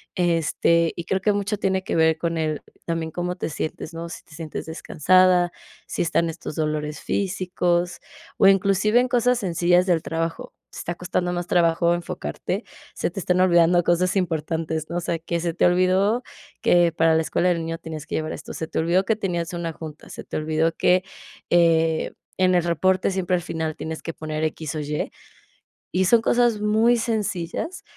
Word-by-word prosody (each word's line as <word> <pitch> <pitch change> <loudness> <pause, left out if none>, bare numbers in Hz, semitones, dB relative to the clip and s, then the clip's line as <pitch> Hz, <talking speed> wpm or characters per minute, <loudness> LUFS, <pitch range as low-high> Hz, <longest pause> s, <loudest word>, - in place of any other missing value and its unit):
Este, 170 -1 +2
y 170 - -5
creo 190 +3 0
que 205 +2 +2
mucho 205 +1 -1
tiene 190 -1 0
que - - -2
ver 160 0 +4
con 165 0 -2
el 155 -2 -1 0.2
también 165 -1 -2
cómo 180 +2 -3
te 180 - -4
sientes, 155 +1 -5
¿no? 165 +1 -5
Si 170 - -9
te - - -19
sientes 160 -2 -6
descansada, 175 +2 +3 0.3
si - - -3
están 165 0 +1
estos 165 -2 -7
dolores 150 -1 -2
físicos, 180 -2 -1 0.4
o - - +6
inclusive 195 +4 +4
en 250 - -1
cosas 250 0 +2
sencillas 175 -2 +2
del 175 -4 +2
trabajo, 165 +1 -4 0.2
te - - -12
está 175 - -4
costando 180 0 -2
más 175 0 -3
trabajo 170 -1 +3
enfocarte, 170 - -4 0.3
se - - -1
te 190 - -5
están 180 0 +1
olvidando 175 -1 +4
cosas 175 +2 +2
importantes, 160 -3 -2
¿no? - - -4
O - - -1
sea, 165 0 -2
que 170 +1 -3
se 170 -1 -1
te - - +2
olvidó, 185 +6 +3 0.4
que 175 -2 +4
para 160 0 +3
la 160 - +3
escuela 175 +3 +1
del 175 - +2
niño 165 0 -4
tienes 160 -2 -7
que - - -3
llevar 155 0 -2
esto, 155 - -7
se 160 - -4
te - - -2
olvidó 170 +4 +2
que 220 +2 0
tenías 180 -4 -2
una 170 -1 -3
junta, 155 -2 -10
se - - -9
te - - -5
olvidó 155 +1 +1
que, 180 +2 +3 0.5
eh, 165 -2 +3 0.3
en 185 0 +4
el 175 -1 +3
reporte 185 +2 +1
siempre 185 -1 0
al 175 - -1
final 160 -2 -3
tienes 160 0 -6
que 165 - -4
poner 155 0 -4
X 155 -1 -3
o - - -2
Y, 150 0 -3 0.8
y 185 +2 +1
son 225 +5 +4
cosas 240 -2 +2
muy 220 +3 +3
sencillas. 220 - -3
175 Hz, 190 wpm, -23 LUFS, 160-185 Hz, 0.8 s, o